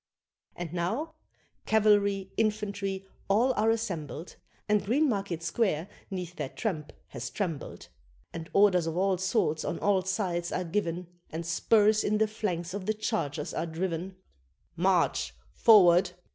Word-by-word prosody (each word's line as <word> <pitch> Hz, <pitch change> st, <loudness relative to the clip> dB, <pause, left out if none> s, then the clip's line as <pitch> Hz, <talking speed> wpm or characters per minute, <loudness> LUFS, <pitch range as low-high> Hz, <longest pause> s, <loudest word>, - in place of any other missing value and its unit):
And 175 Hz, -2 st, -6 dB
now 220 Hz, -, -2 dB, 0.5 s
cavalry, 200 Hz, -3 st, +3 dB
infantry, 200 Hz, -3 st, -1 dB, 0.2 s
all 235 Hz, +6 st, +3 dB
are 220 Hz, -1 st, +2 dB
assembled, 180 Hz, -8 st, -3 dB, 0.3 s
And 210 Hz, -1 st, +2 dB
Greenmarket 200 Hz, -, 0 dB
Square 170 Hz, -1 st, 0 dB, 0.2 s
'neath 180 Hz, -3 st, -5 dB
their 130 Hz, -, -3 dB
tramp 160 Hz, -7 st, -3 dB, 0.2 s
has -, -, -5 dB
trembled; 170 Hz, -8 st, -4 dB, 0.5 s
And 165 Hz, -1 st, -6 dB
orders 185 Hz, -4 st, +4 dB
of 165 Hz, +1 st, -3 dB
all 190 Hz, -1 st, +2 dB
sorts 190 Hz, -5 st, +1 dB
on 170 Hz, -, -2 dB
all 200 Hz, -2 st, +2 dB
sides 185 Hz, -3 st, -2 dB
are 185 Hz, -, -1 dB
given, 175 Hz, -1 st, -2 dB, 0.2 s
And 165 Hz, +1 st, -5 dB
spurs 210 Hz, +5 st, +3 dB
in 210 Hz, +1 st, +1 dB
the 220 Hz, 0 st, +3 dB
flanks 185 Hz, -5 st, -3 dB
of 195 Hz, -2 st, -5 dB
the 215 Hz, -, +1 dB
chargers 175 Hz, -, -2 dB
are 170 Hz, -, -2 dB
driven 175 Hz, +2 st, -3 dB, 0.6 s
"March!" 65 Hz, 0 st, +1 dB, 0.2 s
"Forward!" 180 Hz, -4 st, +6 dB
190 Hz, 135 wpm, -29 LUFS, 170-210 Hz, 0.6 s, Forward